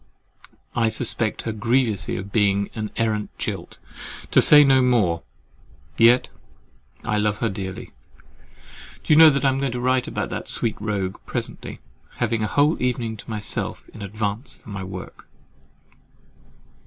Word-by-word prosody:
I 115 -1 +2
suspect 110 -1 -2
her 115 - -2
grievously 110 -3 0
of 95 +2 -7
being 100 -2 +1
an 110 -1 -4
arrant 110 -2 0
jilt, - - -5 0.5
to - - +6
say 150 -1 +8
no 135 -2 +5
more—yet 115 - +1 0.8
I 105 - 0
love 105 0 0
her 115 - 0
dearly. 95 -2 -6 1.1
Do - - +3
you - - +6
know 160 +1 +10 0.2
I'm 135 -1 +2
going 135 -2 -1
to 125 - -3
write 130 0 +1
to - - -6
that - - -4
sweet 115 - -2
rogue 100 -3 -2
presently, - - -5 0.3
having 115 -1 -1
a 110 - 0
whole 145 +6 +2
evening 120 -3 -1
to - - -12
myself 105 -2 -3
in - - -12
advance 105 +4 -4
of - - -27
my 100 -3 -6
work? 95 0 -9
110 Hz, 140 wpm, -23 LUFS, 100-125 Hz, 1.1 s, know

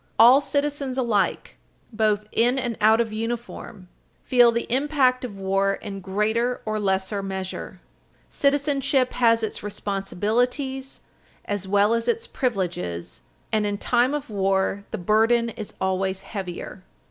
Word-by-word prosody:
All 245 +5 +8
citizens 285 -2 -2
alike, 225 -6 0 0.4
both 215 -1 +1
in 245 +3 +2
and 245 -3 -2
out 220 +1 +5
of 225 -2 0
uniform, 225 -3 -5 0.4
feel 245 -2 +5
the 235 0 -2
impact 265 -2 +2
of 215 -6 -6
war 195 +1 +1
in 200 -2 -7
greater 220 +6 0
or 215 0 -1
lesser 195 0 0
measure. 190 -1 -6 0.5
Citizenship 280 -2 +1
has 230 -2 +3
its 220 - -3
responsibilities, 235 +7 -2 0.4
as 205 -2 -3
well 205 +3 +3
as 230 0 -1
its 460 0 0
privileges, 175 - -3 0.3
and, 215 -1 +2
in 205 0 -2
time 245 +6 +2
of 280 -6 -5
war, 195 0 0
the 220 - -4
burden 225 +5 +2
is 215 -2 -8
always 190 0 -1
heavier. 190 -2 -6
220 Hz, 135 wpm, -24 LUFS, 195-250 Hz, 0.5 s, All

